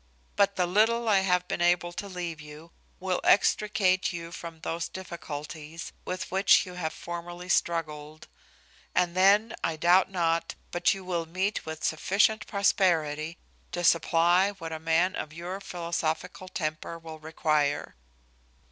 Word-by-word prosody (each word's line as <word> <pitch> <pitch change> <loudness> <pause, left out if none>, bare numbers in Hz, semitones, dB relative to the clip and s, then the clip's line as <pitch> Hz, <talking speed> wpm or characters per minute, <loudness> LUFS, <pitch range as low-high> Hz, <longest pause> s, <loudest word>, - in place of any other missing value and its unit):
But 200 0 +3
the 180 - +2
little 225 +6 +2
I 205 -3 +5
have 180 -1 +1
been - - -3
able 175 0 +2
to 200 - -5
leave 175 -4 -5
you 150 +2 -12 0.3
will 185 -1 -1
extricate 200 -2 +3
you 170 -1 -6
from 165 -2 -8
those 165 0 -3
difficulties 160 -2 -7
with 185 0 -4
which 195 +1 +5
you 180 - -9
have 170 -3 -3
formerly 175 +1 -7
struggled; 155 -3 -1 0.7
and 175 -1 +2
then 205 +4 +4
I 165 - 0
doubt 175 +4 +4
not 170 -3 0 0.2
but 175 +3 +2
you 190 -1 -9
will 170 -3 -2
meet 185 +2 -2
with 160 0 -6
sufficient 210 +6 +2
prosperity 165 -6 +1 0.4
to 175 - -2
supply 175 +3 +4
what 165 -5 -7
a 160 - -4
man 165 +4 +2
of 155 - -5
your 175 +4 -5
philosophical 175 0 -3
temper 160 -2 -4
will 160 -1 -10
require. 155 -2 0
175 Hz, 145 wpm, -28 LUFS, 160-185 Hz, 0.7 s, I